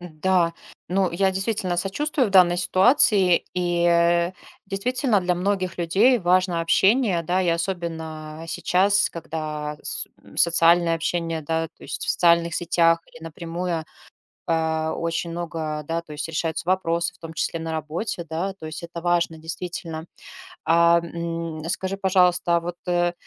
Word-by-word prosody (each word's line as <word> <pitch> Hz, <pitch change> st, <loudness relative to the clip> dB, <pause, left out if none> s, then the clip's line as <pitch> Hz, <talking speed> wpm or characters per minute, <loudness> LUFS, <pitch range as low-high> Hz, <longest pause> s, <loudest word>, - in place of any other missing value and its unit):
Да. 175 Hz, 0 st, 0 dB, 0.3 s
Ну 190 Hz, 0 st, +1 dB
я, 190 Hz, +3 st, +1 dB
действительно, 190 Hz, -2 st, -1 dB
сочувствую 250 Hz, -, 0 dB
в -, -, -7 dB
данной 180 Hz, -2 st, +6 dB
ситуации. 190 Hz, -1 st, +4 dB
И, 175 Hz, -1 st, 0 dB
э, 170 Hz, +1 st, +3 dB, 0.3 s
действительно, 235 Hz, +3 st, 0 dB
для 180 Hz, 0 st, 0 dB
многих 185 Hz, 0 st, -1 dB
людей 195 Hz, +9 st, +3 dB
важно 180 Hz, -2 st, +2 dB
общение, 195 Hz, +2 st, +3 dB
да, 180 Hz, +3 st, 0 dB
и 180 Hz, -, 0 dB
особенно 165 Hz, -3 st, -3 dB
сейчас, 195 Hz, +4 st, +2 dB
когда 155 Hz, -2 st, -5 dB
с -, -, -2 dB, 0.2 s
м, -, -, -17 dB
социальное 170 Hz, 0 st, +4 dB
общение, 165 Hz, -1 st, -2 dB
да, 165 Hz, +2 st, -1 dB
то -, -, -22 dB
есть -, -, -4 dB
в -, -, 0 dB
социальных 170 Hz, -1 st, +3 dB
сетях 165 Hz, -1 st, +2 dB
или 160 Hz, -, -14 dB
напрямую, 170 Hz, 0 st, -4 dB, 0.6 s
э, 160 Hz, -1 st, 0 dB
очень 170 Hz, +1 st, -3 dB
много, 160 Hz, -3 st, -4 dB
да, 165 Hz, +1 st, -1 dB
то 170 Hz, -, -14 dB
есть 150 Hz, +2 st, -4 dB
решаются 165 Hz, +1 st, -3 dB
вопросы, 170 Hz, -2 st, 0 dB
в -, -, -22 dB
том 165 Hz, -1 st, -9 dB
числе 165 Hz, +1 st, -2 dB
на 160 Hz, 0 st, -4 dB
работе, 160 Hz, +4 st, -4 dB
да. 175 Hz, +5 st, -2 dB
То 175 Hz, -5 st, -9 dB
есть 155 Hz, +2 st, -7 dB
это 170 Hz, 0 st, -7 dB
важно, 170 Hz, -2 st, 0 dB
действительно. 165 Hz, 0 st, -6 dB, 0.6 s
А, 170 Hz, +1 st, +5 dB
м, 165 Hz, -1 st, -5 dB
скажи, 190 Hz, +1 st, -2 dB
пожалуйста, 180 Hz, -2 st, +3 dB
а -, -, +1 dB
вот, 175 Hz, +1 st, -6 dB
э, 175 Hz, 0 st, +1 dB
170 Hz, 150 wpm, -23 LUFS, 165-185 Hz, 0.6 s, данной